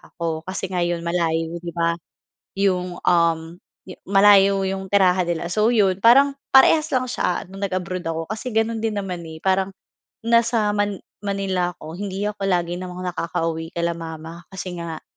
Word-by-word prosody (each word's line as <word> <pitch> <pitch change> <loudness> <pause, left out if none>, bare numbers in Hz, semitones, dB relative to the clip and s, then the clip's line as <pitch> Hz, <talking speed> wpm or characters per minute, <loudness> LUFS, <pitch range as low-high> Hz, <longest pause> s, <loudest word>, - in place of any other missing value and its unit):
ako. 165 -1 -3
Kasi 190 0 -4
nga 180 - -1
yon 175 -1 -1
malayo, 165 -1 -1
di 170 0 -8
ba? 170 -1 +2 0.7
'Yong, 180 -2 0
um, 165 -1 +2 0.3
yo - - -8
malayo 195 0 +5
'yong 190 0 -4
tirahan 185 -2 +4
nila. 170 0 -2
So, 210 +6 +2
yon 195 -5 +2
parang 275 +4 +6 0.2
parehas 305 +4 +6
lang 255 -1 +1
siya 180 -8 -1
no'ng 195 +2 -8
nag-abroad 185 0 -3
ako. 165 0 -2
Kasi 220 +4 -5
gano'n 225 0 0
din 215 -2 -1
naman, 180 -3 -5
eh. 160 -1 -9
Parang 190 +2 +1 0.5
nasa 230 -2 +2
Man 205 -2 -1 0.2
Manila 190 -3 -1
ako. 160 +3 -10
Hindi 195 -1 -4
ako 200 -1 -4
lagi 175 -2 0
namang 180 0 -5
nakakauwi 165 -1 -3
kila 170 0 0
mama. 165 +1 -8
Kasi 185 -2 -5
nga 165 -2 -6
185 Hz, 165 wpm, -22 LUFS, 170-200 Hz, 0.7 s, parang